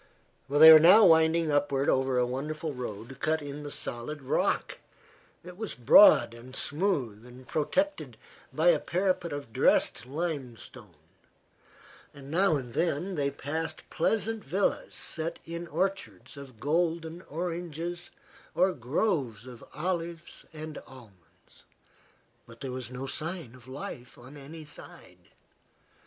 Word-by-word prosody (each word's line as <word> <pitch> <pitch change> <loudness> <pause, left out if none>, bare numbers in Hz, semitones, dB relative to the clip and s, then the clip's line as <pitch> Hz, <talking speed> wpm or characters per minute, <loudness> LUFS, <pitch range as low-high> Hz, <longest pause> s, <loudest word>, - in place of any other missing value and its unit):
They 155 +3 +9
were 155 - +10
now 185 +7 +8
winding 160 0 +4
upward 145 -1 +1
over 130 -1 +2
a 125 - +3
wonderful 150 +5 -4
road 125 +1 -7
cut 160 0 0
in 145 0 -7
the 145 - -7
solid 140 +2 -6
rock. 130 - -1 0.6
It 180 +1 -11
was 220 0 -5
broad 125 - +7
and 125 +3 -12
smooth 145 - -2
and 125 +1 -14
protected 285 - -1 0.3
by - - +3
a - - +4
parapet 180 -2 -1
of 145 -6 -7
dressed 125 - +2
limestone. 140 -5 -6 1.2
Now 160 +6 +1
and 125 -4 -5
then 170 +4 -1
they 145 -4 0
passed 155 +3 -5
pleasant 220 +5 -1
villas 190 +8 -1
set 165 +1 -5
in 170 +1 -6
orchards 190 +4 -3
of 135 -5 -12
golden 165 +3 -1
oranges 170 +1 -5 0.5
or 185 0 +3
groves 130 - -1
of 125 -3 -11
olives 170 +1 -4
and 155 -1 -7
almonds; 110 -9 -19 0.8
but 115 +1 -15
there 135 -2 -5
was 125 -2 -6
no 125 +1 -6
sign 160 -2 -2
of 130 -1 -16
life 130 -2 -8
on 130 +4 -13
any 150 +3 -10
side. 150 - -14
150 Hz, 130 wpm, -28 LUFS, 130-170 Hz, 1.2 s, were